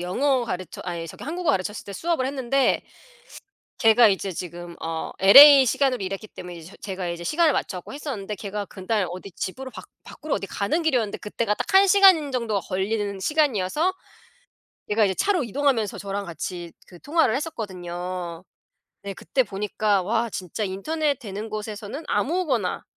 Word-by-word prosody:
영어 250 +8 +1
가르쳐 185 -5 -5
아이 170 -2 -4
저기 - - -10
한국어 335 +1 -1
가르쳤을 205 -2 -2
때 200 - -8
수업을 325 - -1
했는데 270 0 +1 1.0
걔가 225 0 +6
이제 195 0 -1
지금 175 0 -7
어 160 0 -4
LA 275 +8 +10
시간으로 255 -2 +1
일했기 195 +3 -5
때문에 180 -1 -9
이저 165 +4 -12
제가 190 -3 -4
이제 170 0 -5
시간을 310 - +3
맞춰 185 - -2
갖고 180 - -10
했었는데 230 -9 -5
걔가 205 0 -5
그날 195 0 -2
어디 185 +2 -8
집으로 260 +10 -5
밖 - - -10 0.2
밖으로 310 - -5
어디 195 - -3
가는 205 - -1
길이었는데 250 -10 0
그때가 210 0 -2
딱 - - -4
1 390 +1 +7
시간 375 -7 +6
정도가 230 -5 -1
걸리는 200 +1 -2
시간이어서 300 - +1 1.0
얘가 215 +1 +3
이제 195 - +2
차로 365 - +1
이동하면서 235 -3 0
저랑 200 0 -4
같이 175 -1 -6
그 175 - -15
통화를 310 -6 +2
했었거든요. 180 - -5 0.6
네 200 -1 -5
그때 260 - 0
보니까 205 -1 0
와 230 +4 0
진짜 190 +2 -5
인터넷 285 +10 -1
되는 210 -1 -6
곳에서는 215 +6 -6
아무거나 290 - 0
210 Hz, 375 characters per minute, -24 LUFS, 185-275 Hz, 1.0 s, LA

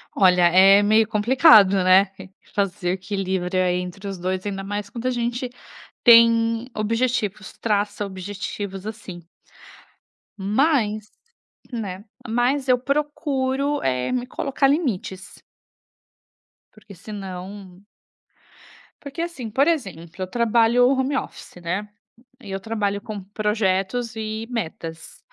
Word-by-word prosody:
Olha, 180 -2 +4
é 195 +3 +6
meio 215 +1 +4
complicado, 210 - +5
né? 190 +1 +5 0.4
Fazer 185 -3 -1
equilíbrio 185 -1 -2
entre 180 +2 -3
os 195 - -4
2, 185 +2 -3
ainda 195 -1 -4
mais 205 +1 -4
quando 235 +4 -5
a - - +1
gente 240 +1 -2 0.5
tem 230 0 +5
objetivos, 215 -2 -1
traça 205 -1 -1
objetivos 195 +1 -6
assim. 200 -6 -8 1.1
Mas 215 0 0 0.6
né, 200 -5 -5 0.2
mas 250 +4 0
eu 250 -1 +4
procuro, 280 0 -1
eh, 125 - -1
me 250 -1 -1
colocar 275 +1 -1
limites. 230 - -2 1.3
Porque 215 -2 -15
se 200 +5 -11
não 190 0 -8 1.2
Porque, 285 +3 -6
assim, 335 -9 -5
por 270 +7 +2
exemplo, 185 - -2
eu 185 - -2
trabalho 235 +3 +3
home 270 +1 0
office, - - -7
né? 180 +5 -3 0.5
E 205 - -9
eu 195 - -3
trabalho 205 -2 -2
com 210 -1 -7
projetos 210 +2 -1
e 220 0 -4
metas. 165 -7 -6
210 Hz, 115 wpm, -22 LUFS, 190-240 Hz, 1.3 s, é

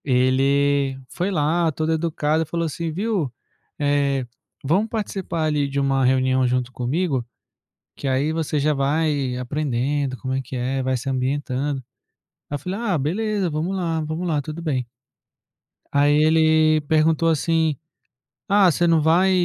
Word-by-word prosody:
Ele 135 +1 +2
foi 180 +2 -2
lá 165 -1 +1
todo 155 +2 -2
educado 160 -1 0
e - - -8
falou 170 +2 -2
assim: 165 +1 -3
"Viu, 190 - -1 0.5
eh, 140 -2 +1 0.4
vamos 190 +11 +1
participar 195 -6 -3
ali 150 -2 +1
de 140 +1 -1
uma 135 -1 +1
reunião 130 0 +2
junto 125 0 -1
comigo, 130 +2 -1 0.7
que 140 - -5
aí 135 +4 +1
você 160 -2 -1
já 150 +2 +2
vai 140 -2 0
aprendendo 135 0 -1
como 130 0 -4
é 135 - 0
que 130 0 -8
é, 130 +2 -1
vai 130 0 0
se 130 +3 -8
ambientando". 135 +1 -1 0.7
Aí 145 - -3
eu - - -4
falei: 185 +7 -4
"Ah, 205 -7 0
beleza, 195 +6 -1
vamos 160 +5 -2
lá, 165 -3 -1
vamos 155 +3 -3
lá, 155 -4 0
tudo 155 +3 -7
bem". 135 -7 -2 1.0
Aí 145 +1 +4
ele 155 0 +4
perguntou 160 +2 +2
assim: 160 -1 +1 0.7
"Ah, 200 -2 +5
você 175 +1 +1
não 165 -2 +4
vai 170 +5 +4
150 Hz, 155 wpm, -22 LUFS, 135-165 Hz, 1.0 s, Ah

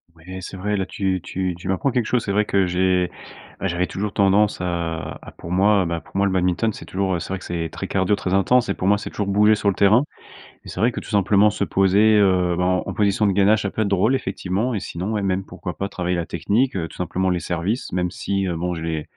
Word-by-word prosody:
Oui, 80 - -19 0.2
c'est 95 - -8
vrai, 105 +2 -1
là 95 - -1
tu 95 0 -1
tu 90 +1 -3
tu 90 - -9
m'apprends 95 +9 0
quelque 125 -2 0
chose, 120 +1 0
c'est 100 - -2
vrai 105 +1 +2
que 100 -2 +2
j'ai 90 0 +1 0.5
ouais, 95 - 0
j'avais 90 0 0
toujours 100 +1 -4
tendance 100 +1 +3
à 85 -2 -3
à - - -11
pour 85 - -8
moi 95 +1 +3
bah, 85 0 -2
pour - - -21
moi, 100 - +3
le 100 - +1
badminton 90 +4 +1
c'est - - -10
toujours, 95 -1 -1
heu, - - -2
c'est 85 - -7
vrai 95 - -3
que - - -12
c'est 85 -2 -3
très - - -5
cardio, 95 +1 +1
très 95 -2 -3
intense 110 +6 +3
et - - +2
pour 95 - -3
moi, 105 - +4
c'est - - -6
toujours 105 - -3
bouger 105 +2 +4
sur 105 -1 +1
le 95 - -1
terrain. 105 +6 +4 0.6
Et - - -12
c'est - - -6
vrai 120 +3 +3
que, - - -5
tout - - -11
simplement, 100 0 +4
se 105 - -4
poser, 100 +3 +3
heu, 90 -4 +3
bah, 90 - 0
en 90 0 +1
en 95 - -4
position 105 +1 +2
de 100 - +2
gainage, 100 +3 +3
ça 100 - -2
peut 110 - -2
être 105 - 0
drôle, 100 +6 +2
effectivement. 100 +1 -2
Et 105 - -2
sinon, 95 +3 -4
ouais, 105 - -1
même 95 0 -1
pourquoi 90 -3 -7
pas 100 +5 -3
travailler 90 -2 -2
la 85 -1 -2
technique, 105 +10 0
heu, 85 -3 -2
tout - - -14
simplement 95 +1 -1
les 90 -1 0
services, 90 - -3
même 90 -1 0
si, 100 +1 -2
heu, 85 - -2
bon, 90 +1 -2
je 80 - -6
les 80 -2 -2
95 Hz, 270 wpm, -22 LUFS, 90-105 Hz, 0.6 s, moi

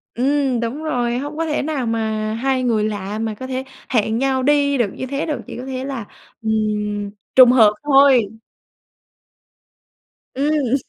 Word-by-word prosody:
Ừm, 270 0 +1
đúng 235 +7 -4
rồi, 245 -5 -1
hông 290 +3 -5
có 330 - -1
thể 300 -2 -1
nào 285 -3 -2
mà 220 -1 -1
hai 260 +3 0
người 225 -4 +1
lạ 205 0 -3
mà 225 -1 -2
có 260 +5 -7
thể 260 0 -3 0.3
hẹn 220 -2 +1
nhau 265 0 0
đi 285 0 +3
được 230 -6 0
như 260 - -5
thế 280 +3 -3
được, 305 -3 -3
chỉ - - -8
có 250 - -7
thể 260 0 -4
là, 265 -6 -5 0.4
ừm, 220 -1 -1 0.8
trùng 255 -2 +9
hợp 220 -4 +6
thôi. 270 -7 +4 2.0
Ừm. 280 -2 +1
255 Hz, 165 wpm, -20 LUFS, 225-280 Hz, 2.0 s, trùng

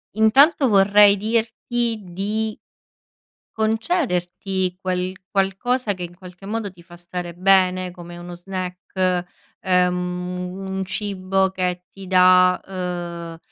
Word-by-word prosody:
intanto 270 +7 +5
vorrei 200 0 +6
dirti 230 +2 -1
di 210 +4 -3 0.9
concederti 195 - -1
quel 185 -1 -1 0.2
qualcosa 205 +4 0
che, 180 - -8
in 175 0 -10
qualche 180 +1 -13
modo, 220 0 -2
ti 175 -2 -17
fa 175 0 -14
stare 175 0 -6
bene, 185 0 +3
come 175 -1 -10
uno 175 0 -8
snack, 185 0 -2 0.4
ehm, 180 -1 0
u 180 +1 -6
un 190 0 -2
cibo 190 -1 0
che 180 -1 -2
ti 195 -1 -11
dà, 185 0 +5
uhm, 175 -3 -5
185 Hz, 115 wpm, -22 LUFS, 180-205 Hz, 0.9 s, vorrei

